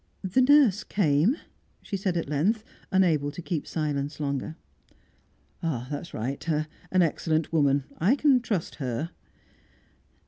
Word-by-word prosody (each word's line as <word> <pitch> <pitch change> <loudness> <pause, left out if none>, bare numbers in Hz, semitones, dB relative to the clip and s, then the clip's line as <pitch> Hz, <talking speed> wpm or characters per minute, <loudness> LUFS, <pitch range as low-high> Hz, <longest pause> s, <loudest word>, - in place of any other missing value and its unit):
"The 190 +7 +2
nurse 255 -7 +5
came," 180 - +2 0.5
she 200 - -4
said 190 -2 -1
at 165 - -2
length, 185 +10 +1 0.3
unable 165 -7 +3
to 150 - -9
keep 170 -2 -3
silence 145 -2 -2
longer. 140 +1 -2 1.1
"That's 145 +1 -3
right. 130 +6 -4
An 155 +4 0
excellent 160 0 0
woman; 140 -3 +3 0.2
I 200 - +4
can 280 -3 +4
trust 205 -8 -3
her." 130 +6 -2
160 Hz, 125 wpm, -27 LUFS, 145-195 Hz, 1.1 s, nurse